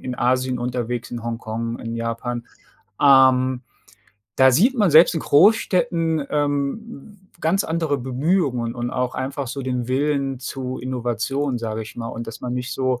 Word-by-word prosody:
in 125 -1 -4
Asien 130 0 +1
unterwegs, 120 -1 -3
in 120 - -5
Hongkong, 115 0 -4
in 115 0 -5
Japan. 115 +1 -3 0.6
Ähm, 130 -2 +5 0.7
da 130 0 +6
sieht 225 - +4
man 205 -6 +3
selbst 160 +4 +7
in 160 - -1
Großstädten, 165 -3 +3
ähm, 150 +7 -3
ganz 185 +5 +1
andere 160 -3 -1
Bemühungen 130 -2 0
und 120 0 -3
auch 125 -1 -2
einfach 130 0 -4
so 135 +1 -5
den 125 -2 -3
Willen 135 0 0
zu 130 +1 -5
Innovationen, 125 +2 -2
sage 110 -1 -4
ich 105 - -11
mal, 115 -1 -5
und 115 +1 -6
dass 115 - -8
man 125 - -3
nicht 125 0 -4
so 130 -2 -1
130 Hz, 155 wpm, -22 LUFS, 120-145 Hz, 0.7 s, selbst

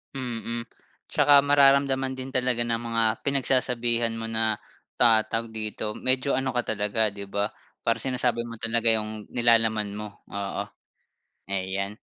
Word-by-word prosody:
Mm, 120 -2 -4 0.4
'tsaka 145 -1 +4
mararamdaman 135 -2 +3
din 130 0 -6
talaga 125 -2 +1
ng 115 -1 -1
mga 115 -1 +1 0.2
pinagsasabihan 125 -4 +1
mo 115 - -4
na 110 -1 0 0.4
ta 115 -2 +5
tawag 115 +1 -4
dito, 110 -1 -3
medyo 130 +3 +1
ano 130 0 0
ka 120 -1 -1
talaga, 105 0 0
'di 100 -1 -8
ba, 100 +1 -2 0.3
para 115 - +2
sinasabi 125 -3 0
mo 115 0 -7
talaga 115 +1 +1
'yong 110 -1 -1
nilalaman 115 -3 +2
mo. 105 +1 -5 0.3
Oo, 100 0 -3 0.8
ayan. 100 +2 -3
115 Hz, 140 wpm, -25 LUFS, 110-125 Hz, 0.8 s, ta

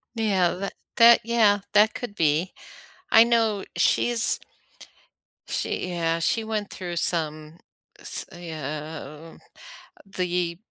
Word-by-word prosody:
Yeah, 195 -6 +1
that 195 +2 -5 0.2
that, 235 0 +7
yeah, 220 -3 +3
that 210 +1 +5
could 240 -5 -6
be. 160 +3 +1 0.6
I 225 +1 +7
know 225 -4 +1
she's 240 -1 +3 1.1
she, 180 - -2
yeah, 165 -1 -1
she 225 +7 0
went 215 -2 -3
through 175 -2 -6
some, 155 -1 -2 0.4
s - - -5
uh, 155 -1 -8 0.7
the 180 -3 -2
180 Hz, 105 wpm, -24 LUFS, 165-220 Hz, 1.1 s, that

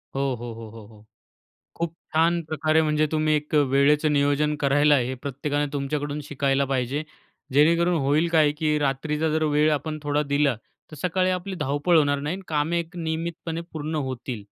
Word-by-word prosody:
हो, 135 - 0 0.2
हो, 120 -1 -6
हो, 115 -1 -9
हो, 110 -1 -12
हो 110 -1 -18 0.7
खूप 170 -1 -3 0.2
छान 170 +1 +3
प्रकारे, 155 0 +1
म्हणजे 155 0 +2
तुम्ही 155 0 +2
एक 150 +1 -4
वेळेचं 145 +2 +3
नियोजन 145 +1 +2
करायला 145 +1 +4
आहे, 125 -4 +2
हे 130 - -3
प्रत्येकाने 140 +3 -2
तुमच्याकडून 145 +1 -3
शिकायला 140 -1 0
पाहिजे. 130 +3 -1 0.5
जेणेकरून 170 +4 +4
होईल 150 +5 +2
काय, 155 -2 +5
की 150 0 0
रात्रीचा 150 +3 -1
जर 155 0 0
वेळ 150 +1 +4
आपण 155 +1 -2
थोडा 145 0 0
दिला, 140 -2 +1 0.4
तर 155 - -10
सकाळी 185 +1 +1
आपली 185 +1 -3
धावपळ 145 +4 +1
होणार 145 -1 +2
नाही 150 +5 -2
आणि 195 - -10
कामे 155 +2 0
एक 170 +2 -9
नियमितपणे 165 0 -4
पूर्ण 155 0 -4 0.2
होतील. 125 -3 -5
150 Hz, 175 wpm, -24 LUFS, 140-160 Hz, 0.7 s, काय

